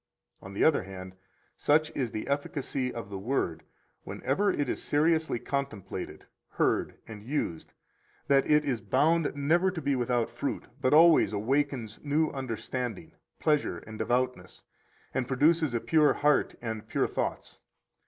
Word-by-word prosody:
101 95 - -11
On - - -10
the - - +6
other 120 -12 +1
hand, 95 -1 -8 0.4
such 155 +1 +2
is 130 -4 -1
the 110 -1 -5
efficacy 140 -2 -2
of 115 -4 -7
the 95 - -4
Word, 95 -7 -1 0.4
whenever 205 +1 0
it 145 -7 0
is - - -2
seriously 160 -1 +1
contemplated, 105 - -5 0.2
heard, - - 0
and 110 -2 -9
used, 115 - -3 0.5
that 135 -1 +3
it 150 0 +4
is 125 -6 -1
bound 155 - +2
never 165 +6 +2
to 180 -2 -4
be 140 -2 0
without 120 -2 0
fruit, - - -3 0.2
but 130 - +2
always 160 -5 +6
awakens 125 0 -1
new 150 +2 +1
understanding, 130 +4 -4 0.3
pleasure, 150 -2 +1
and 110 0 -10
devoutness, 125 +1 -1 0.5
and 130 -2 -1
produces 150 +1 +2
a - - +2
pure 155 +3 +3
heart 150 0 +2
and 110 -2 -4
pure - - +1
thoughts. - - -4
135 Hz, 150 wpm, -29 LUFS, 115-150 Hz, 0.5 s, the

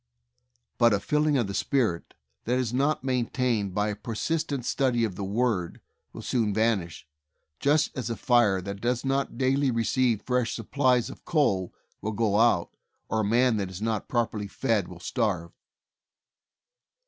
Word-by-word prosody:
But 115 -3 +5
a - - -1
'filling 150 +5 +1
of 120 - +1
the 100 - -5
Spirit' 110 -8 -1 0.3
that 125 +2 +1
is 125 -2 -1
not 140 +2 +1
main 125 -3 0
tained 110 -7 -1
by 105 0 +1
a 105 - -3
persistent 135 +5 -2
study 125 -4 +1
of 110 -4 -1
the 100 - -5
Word, 100 -3 -1 0.3
will - - -9
soon 110 -5 0
vanish," 105 -9 0 0.5
just 145 +2 +2
as 125 -3 -3
a 115 - -2
fire 110 -7 +3
that 100 +1 -6
does 125 +2 -1
not 135 -2 -1
daily 135 +2 +2
receive 115 -1 +1
fresh 125 -4 0
supplies 125 +1 +1
of - - -13
coal 100 - +1 0.3
will 110 - -3
go 105 -1 +1
out, 115 -7 +3 0.4
or 110 - 0
a - - +1
man 120 +2 +3
that 100 -2 -2
is 95 0 -8
not 110 -1 -2
properly 110 -4 -1
fed 110 -2 0
will 90 - -11
starve. 90 -5 -1
115 Hz, 165 wpm, -27 LUFS, 105-130 Hz, 0.5 s, But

